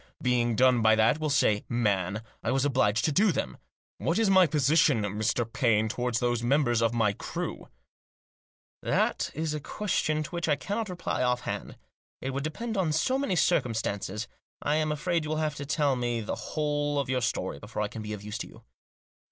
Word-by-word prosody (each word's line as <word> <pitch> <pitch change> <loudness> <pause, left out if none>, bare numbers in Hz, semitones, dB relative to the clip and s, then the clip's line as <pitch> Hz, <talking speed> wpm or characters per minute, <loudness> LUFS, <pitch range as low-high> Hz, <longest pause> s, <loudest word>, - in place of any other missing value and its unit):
Being 120 -4 +1
done 125 0 +4
by 110 0 +5
that, 110 +7 +3
we'll 155 -1 -1
say, 105 -7 +2
man, 105 -3 0 0.2
I - - -2
was 135 +1 +1
obliged 120 -6 +2
to 155 - +2
do 200 +7 +4
them. 65 - -3 0.4
What 165 - 0
is 220 -3 +3
my 190 -2 +6
position, 150 -4 +3
Mr. 110 +4 0
Paine, 115 -2 +1
toward 125 +1 -2
those 120 0 +1
members 120 -2 +2
of 115 0 +2
the 110 -3 +2
crew? - - -5 0.6
" - - -85
"That - - 0
is 155 0 -2
a 150 - -2
question 155 -3 -1
to 150 - -9
which 170 -2 -2
I 145 - +4
cannot 205 +8 -3
reply 180 -1 -3
off 125 -1 +1
hand. - - -5 0.4
It 135 - -3
would 135 +1 -3
depend 220 +9 -4
on 175 -5 +1
so 255 - +1
many 240 -10 0
circumstances. 110 - 0 0.3
I 150 +1 0
am 155 -1 0
afraid 165 +2 0
you 150 - -5
will 155 - -1
have 155 -1 0
to 140 -1 -7
tell 145 -3 +2
me 120 -1 -1
the 105 - -3
whole 145 -1 -1
of 140 -1 0
your 130 -1 0
story 115 -10 -2
before 105 +3 -4
I - - -1
can 110 - -8
be 105 0 -5
of 105 -1 -7
use 105 +1 -5
to - - -5
you." - - -16
130 Hz, 205 wpm, -28 LUFS, 115-155 Hz, 0.6 s, my